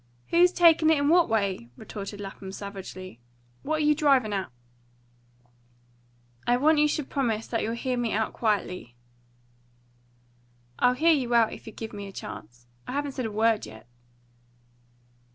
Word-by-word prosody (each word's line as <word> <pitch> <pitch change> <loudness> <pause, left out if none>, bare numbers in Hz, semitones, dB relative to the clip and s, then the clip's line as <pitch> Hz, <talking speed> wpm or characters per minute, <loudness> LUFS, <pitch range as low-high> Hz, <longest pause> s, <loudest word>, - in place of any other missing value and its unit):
"Who's 350 +1 +5
takin' 330 -3 +5
it 290 -3 +3
what 335 +1 +4
way?" 200 - -1
retorted 205 -1 -7
Lapham 195 -1 -8
savagely. 190 - -8 0.4
"What 310 +1 -1
are - - +1
you 300 - +5
drivin' 275 -8 +2
at?" 195 -5 -2 2.0
"I 245 0 +4
want 305 +3 +4
you 300 - +5
should 300 -2 -2
promise 230 -6 -1
that 230 - -2
you'll 225 +2 -2
hear 250 +1 -2
me 235 -2 -1
out 220 +1 -1
quietly." 180 - -2 1.8
"I'll 250 0 +4
hear 330 +5 +4
you 250 -5 0
out 230 -2 +4
if - - -12
you'll 220 - -9
give 225 -1 -7
me 200 -1 -6
a - - -9
chance. 120 - -9 0.2
I - - -5
haven't 285 0 -2
said 255 -3 -3
a - - -6
word 220 0 +1
yet." 110 +2 -13
225 Hz, 155 wpm, -27 LUFS, 200-285 Hz, 2.0 s, Who's